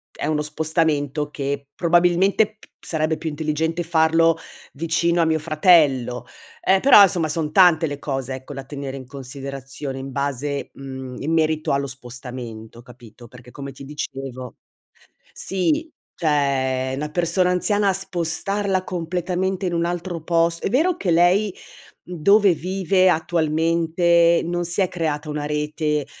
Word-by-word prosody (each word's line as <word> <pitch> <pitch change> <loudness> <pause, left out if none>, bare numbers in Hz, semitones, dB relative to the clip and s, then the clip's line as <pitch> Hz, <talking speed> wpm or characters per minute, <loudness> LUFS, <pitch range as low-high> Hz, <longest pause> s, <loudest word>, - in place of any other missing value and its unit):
è - - -3
uno 155 -1 0
spostamento 150 -1 -1
che 140 -1 -4
probabilmente 180 +5 +3
p - - -20
sarebbe 155 -1 -1
più 160 +1 -4
intelligente 160 +2 -2
farlo 165 0 +3 0.4
vicino 170 +3 +1
a - - +3
mio 160 0 +1
fratello, 150 -6 +3 0.4
ehm, 190 0 +3
però 270 -6 +8
insomma, 175 -5 +2
son 155 0 -1
tante 175 -3 +5
le 145 -1 -5
cose, 135 -2 -3
ecco, 130 0 -9
da 135 - -7
tenere 140 -1 -6
in 130 -2 -10
considerazione 135 0 -7
in 135 +1 -7
base 140 +1 -3
mhmm, 130 -2 -8
in 155 +3 -1
merito 155 -1 +1
allo 140 0 0
spostamento, 120 -3 -9
capito, 120 -1 -15
perché 125 +1 -15
come 140 +2 -8
ti 135 +1 -11
dicevo 135 -3 -7 0.8
sì, 300 - -1 0.3
cioè, 135 -4 0
una 150 +2 -3
persona 175 +2 +1
anziana, 200 +2 +1
spostarla 195 +1 -1
completamente 180 +2 -2
in 175 - -2
un 170 0 0
altro 175 0 -4
pos 170 0 +1
è - - -1
vero 325 +8 +2
che 185 - -1
lei, 180 +4 +3 0.5
dove 195 +3 +3
vive 185 +2 +1
attualmente, 170 +1 +2
non 175 +1 -2
si 175 +3 0
è 185 - +2
creata 155 -3 -3
una 150 0 -3
rete, 150 0 -1
160 Hz, 140 wpm, -22 LUFS, 140-175 Hz, 0.8 s, però